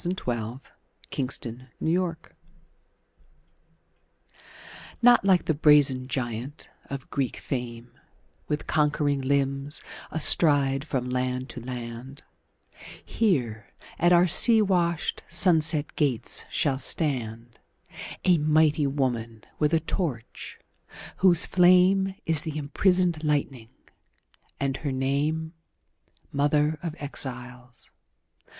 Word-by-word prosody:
The 175 - -2
New 185 - -2
Colossus 120 -4 -5 0.5
Emma 125 -3 -4 0.2
Lazarus 170 0 -1 2.8
NOT 245 -3 +6
like 190 -2 +3
the 160 - +1
brazen 145 -4 +3
giant 130 +2 -5 0.2
of 140 -1 -8
Greek 135 -3 -2
fame, 120 -3 -6 0.6
With 150 0 -3
conquering 150 -2 0
limbs 140 +1 -2 0.3
astride 145 -3 +3
from 130 -4 -3
land 125 +1 -2
to 125 - -7
land; 125 +2 -8 0.8
Here 120 - -1 0.3
at 175 +1 +3
our 175 0 +5
sea 220 +6 +6
washed, 175 -5 0
sunset 160 -3 +2
gates 130 -6 -1
shall 135 -3 -1
standA 120 -6 -1 0.8
mighty 155 -1 +2
woman 120 -5 -3 0.2
with 150 0 +1
a 165 - +3
torch, 155 - -5 0.6
whose 180 -3 +5
flameIs 185 -2 +3
the 155 -2 -5
imprisoned 175 +2 0
lightning, 140 -6 -2 0.9
and 135 -1 -2
her 150 - -4
nameMother 140 +5 -2 1.3
of 165 -3 -5
Exiles. 125 -3 -6
145 Hz, 95 wpm, -25 LUFS, 125-160 Hz, 2.8 s, NOT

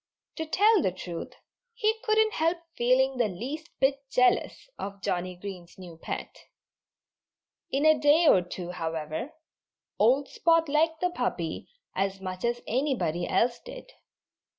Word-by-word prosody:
To 320 - -3
tell 415 +4 +4
the 185 - +1
truth, 175 -2 -7 0.4
he 445 -1 +1
couldn't 435 0 +3
help 330 +3 +1 0.2
feeling 255 +2 +2
the 240 -3 +2
least 270 - -6
bit 270 +1 +2
jealous 250 - +2
of 200 0 -6
Johnnie 180 0 -2
Green's 180 -2 -9
new 180 -3 -10
pet. 165 - -7 1.2
In 280 +3 0
a 310 -1 +6
day 295 +4 +5
or 190 - +6
two, 180 0 -6
however, 160 - -4 0.7
old 265 +6 +4
Spot 330 -1 +2
liked 315 +2 +1
the 360 0 +1
puppy 180 - -3 0.3
as 195 0 -1
much 185 -1 -6
as 240 0 -1
anybody 210 - -1
else 235 +5 +1
did. - - -11
250 Hz, 140 wpm, -28 LUFS, -, 1.2 s, a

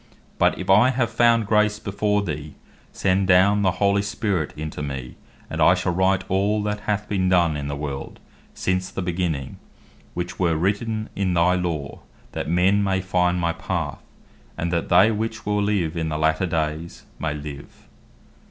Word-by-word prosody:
But - - +3
if - - -6
I 105 +6 +6
have 120 -3 0
found 115 -1 +3
Grace 105 0 +2
before 105 0 -1
thee, 75 -4 -5 0.4
send 95 0 +1
down 95 +3 +5
the 95 -2 +2
holy 100 +2 +2
Spirit 100 -5 -2
into 75 -1 -5
me, 65 -3 -5 0.3
and - - -4
I - - +6
shall 90 - -1
write 95 +1 +2
all 100 +3 +1
that 105 0 -2
hath 105 0 -1
been 95 -2 0
done 85 -4 +3
in 70 -1 -4
the 70 - -3
world, 70 -2 -6 0.4
since 95 0 -1
the 95 - -4
beginning, 85 -6 -2 0.6
which 90 0 -4
were 85 -3 +2
written 110 +5 -1
in 95 -2 0
thy 85 +2 +4
Law, 85 -6 -3 0.3
that - - -4
men 95 +4 +3
may 95 -1 +1
find 90 -1 0
thy 85 0 +1
path, - - -4 0.6
and 85 +1 -2
that 85 - -1
they 95 +5 +6
which 110 +1 -3
will 105 0 +1
live 100 -6 0
in 80 -1 -2
the 75 - -2
later 80 +4 +1
days, 80 0 -3
may 75 -2 -2
live." 75 -1 -9
95 Hz, 175 wpm, -23 LUFS, 80-100 Hz, 0.6 s, I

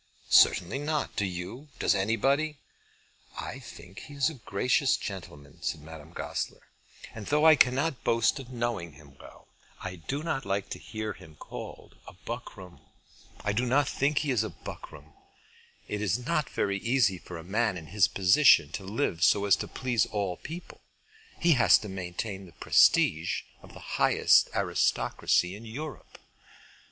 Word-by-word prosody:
certainly 90 +10 +5
not. 150 0 -2
Do 105 - 0
you? 95 +11 -7
Does - - +2
anybody?" 135 +10 +1 0.8
"I - - -6
think 95 +4 -12
he 145 -2 -11
is 140 +3 +1
a 130 -8 -15
gracious 125 +7 +2
gentleman," 75 -7 -9
said - - -3
Madame 80 0 -11
Goesler, - - -5 0.4
"and 105 -3 -8
though 150 +2 +2
I 160 -1 +9
cannot 135 +2 +2
boast 115 +4 +2
of 130 -2 -9
knowing 120 - -3
him 70 -2 -17
well, - - -15 0.3
I 95 -1 -6
do 140 - -4
not 150 -5 -2
like 100 0 -2
to - - -5
hear 110 -1 -5
him 80 -4 -15
called - - -10 0.3
buckram. 105 -6 -8 0.6
I 105 - -1
do 120 +4 0
not 135 +3 +2
think 140 +2 0
he 145 -2 +1
is 120 -5 +2
buckram. 80 -8 -9 0.7
It 105 - -3
is 105 0 +1
not 150 +3 -1
very 100 0 -1
easy 115 -5 +2
for 90 - -9
a 80 - -9
man 105 +2 0
in 80 - -9
his 95 +4 +3
position 95 +10 +5
to 100 - -5
live 95 - -1
so 100 +2 +4
as 100 - +5
to - - -5
please 125 -3 0
all 100 -4 -2
people. 165 - -9 0.6
He 170 - +3
has 125 -6 +6
to 105 - -8
maintain 95 +1 -5
the 85 - -17
prestige 80 +1 +3 0.2
of - - -15
the - - -10 0.2
highest - - +5
aristocracy 90 +2 +1
in 105 - -11
Europe." 135 +2 -8
110 Hz, 160 wpm, -28 LUFS, 90-135 Hz, 0.8 s, I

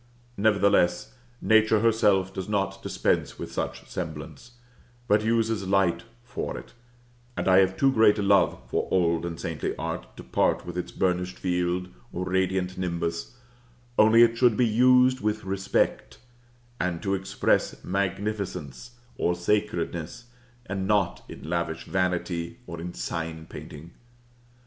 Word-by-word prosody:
Nevertheless, 100 -4 +2 0.3
nature 110 -1 +4
herself 105 -5 +3
does 95 +1 -5
not 95 -1 -1
dispense - - -1
with - - -7
such - - -4
semblance, 80 - -7 0.5
but 105 -1 +3
uses 110 -3 0
light 95 -3 +2 0.2
for 125 +1 -5
it; - - -11 0.6
and - - -2
I 95 0 +6
have 95 0 +2
too 135 -1 +4
great 110 -4 +5
a 105 - -1
love 100 -2 +3
for - - -1
old 85 -2 +1
and 85 -1 -6
saintly 80 -2 -3
art - - -6
to - - -9
part - - +1
with 90 - -7
its 90 - -4
burnished 90 0 -1
field, 90 0 -1 0.2
or 90 +1 -3
radiant 95 0 -1
nimbus; 85 +3 -3 0.6
only 110 +2 +7
it 115 0 +2
should 120 -4 +4
be 125 - +4
used 125 +3 +4
with 105 0 -1
respect, 95 0 -1 0.6
and 90 -2 -1
to 100 -1 0
express 95 +1 0
magnificence, 100 - -3 0.2
or 90 - +1
sacredness, 90 0 -2 0.4
and 95 -2 -3
not 100 -4 +1
in - - -9
lavish 85 -1 -2
vanity, 90 0 -2
or 85 -5 -7
in 90 +1 -6
sign 80 +5 -4
painting. 80 +2 -10
95 Hz, 140 wpm, -26 LUFS, 85-105 Hz, 0.6 s, only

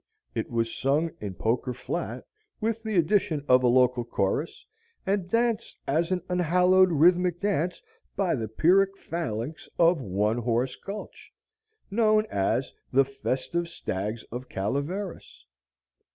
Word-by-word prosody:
It - - -3
was 115 -1 -1
sung 150 +5 +1
in 100 -3 -5
Poker 125 +4 -1
Flat - - -4 0.3
with 225 0 -1
the 220 -2 -3
addition 165 -4 +2
of 125 0 +6
a 125 - +3
local 125 0 +4
chorus, 120 - -2 0.4
and 190 -2 0
danced 230 +1 0
as 165 +4 +1
an 185 -2 -1
unhallowed 180 +1 +4
rhythmic 175 +2 +4
dance 180 -3 -1 0.3
by 190 -3 +1
the 115 -4 -2
Pyrrhic 195 - +3
phalanx 155 - -4
of 170 -2 +4
One 105 +2 0
Horse 120 +2 0
Gulch, 200 +1 -9 0.6
known 215 0 +3
as 100 +7 0 0.2
"The 135 +1 +5
Festive 135 +5 -2
Stags 105 - -4
of 125 +2 -6
Calaveras." 145 - -4
160 Hz, 130 wpm, -27 LUFS, 125-185 Hz, 0.6 s, of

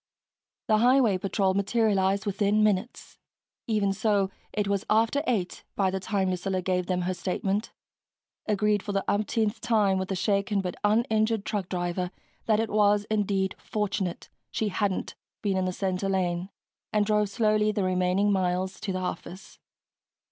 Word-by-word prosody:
The 215 0 +4
highway 240 -5 +4
patrol 195 0 +1
materialized 200 -1 +1
within 205 +1 +2
minutes. 210 +2 -1 0.5
Even 210 -3 +1
so, 200 -2 +1 0.2
it 210 -2 -1
was 200 -1 0
after 225 +6 +3
eight 200 -8 -1
by 190 -2 +1
the 190 - -2
time 190 -1 0
Lucilla 185 +1 -1
gave 180 -1 -1
them 180 -1 0
her 185 +1 -1
statement, 190 +4 -2 0.8
agreed 210 -1 +2
for 205 - -5
the 195 -1 -1
umpteenth 215 +1 0
time 210 -5 +2
with 190 - -3
the 195 - -1
shaken 200 +1 +1
but 180 -2 -2
uninjured 220 0 +2
truck 200 -4 -2
driver 180 0 -2 0.4
that 215 -1 +3
it 225 -1 -1
was 210 -1 +3
indeed 195 -2 +1
fortunate 200 -4 -3 0.2
she 220 - -1
hadn't 200 0 -1 0.3
been 200 -2 +1
in 185 0 +1
the 185 - 0
center 190 +1 -2
lane, 180 -1 -1 0.4
and 210 -1 +2
drove 210 -1 +2
slowly 215 0 +2
the 205 -2 -1
remaining 185 +2 +2
miles 185 0 0
to 205 - -3
the 185 - -2
office. 185 +1 -6
200 Hz, 155 wpm, -27 LUFS, 185-215 Hz, 0.8 s, The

